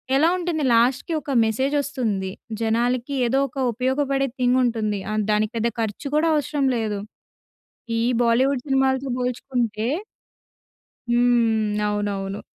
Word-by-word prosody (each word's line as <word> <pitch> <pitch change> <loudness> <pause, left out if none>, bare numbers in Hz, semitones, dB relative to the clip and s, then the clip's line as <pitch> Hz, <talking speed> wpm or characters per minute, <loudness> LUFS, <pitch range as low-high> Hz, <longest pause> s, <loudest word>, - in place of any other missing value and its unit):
ఎలా 315 +5 +4
ఉంటుంది 335 -4 -2
లాస్ట్‌కీ 250 +8 +2
ఒక 280 - -5
మెసేజ్ 260 +6 0
వస్తుంది. 230 -10 -2 0.3
జనాలకి 240 +4 0
ఏదో 265 +3 +2
ఒక 270 +1 -15
ఉపయోగపడే 270 +3 0
థింగ్ 250 +1 +3
ఉంటుంది. 215 -4 0
ఆహ్, 215 -1 0
దానికి 210 +1 +1
పెద్ద 230 +1 +1
ఖర్చు 225 +6 -3
కూడా 325 +2 +3
అవసరం 285 -1 0
లేదు. 210 -3 -2 1.0
ఈ - - +1 0.2
బాలీవుడ్ 250 +3 +2
సినిమాలతో 265 0 +1
పోల్చుకుంటే 245 -3 -2 1.2
హ్మ్. 230 -3 +2
అవునవును. 205 -1 -2
245 Hz, 120 wpm, -23 LUFS, 220-270 Hz, 1.2 s, ఎలా